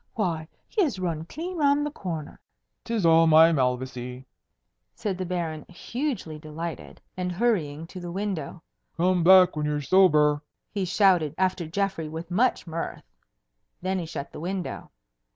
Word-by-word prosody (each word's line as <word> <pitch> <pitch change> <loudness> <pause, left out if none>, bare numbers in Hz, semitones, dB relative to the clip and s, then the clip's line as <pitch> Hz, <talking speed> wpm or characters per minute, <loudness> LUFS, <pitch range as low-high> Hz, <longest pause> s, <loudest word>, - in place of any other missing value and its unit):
Why, 170 -7 -1 0.2
he 430 - 0
has 290 - +1
run 165 -4 -3
clean 340 - -6
round 290 -1 +3
the 295 - -3
corner." 165 - -6 0.5
"'Tis 225 -6 -1
all 165 0 +6
my 160 +1 +7
Malvoisie," 125 -2 -2 0.7
said 200 -3 -2
the 185 - -3
Baron, 165 -4 -3
hugely 200 - -4
delighted, 160 +2 -7 0.2
and 180 -1 -2
hurrying 170 -8 0
to 185 +2 -9
the 175 -1 -6
window. 185 -4 -4 0.3
"Come 180 0 +2
back 185 0 +7
when 150 -1 -1
you're 150 0 0
sober!" 150 -3 +4 0.3
he 195 -2 -1
shouted 180 -5 +3
after 185 -3 0
Geoffrey 190 -2 -2
with 165 +2 -7
much 240 +8 +2
mirth. 165 -1 -5 0.8
Then 190 0 0
he 170 - -5
shut 140 -3 -6
the - - -9
window. 180 +3 -4
175 Hz, 150 wpm, -26 LUFS, 155-190 Hz, 0.8 s, my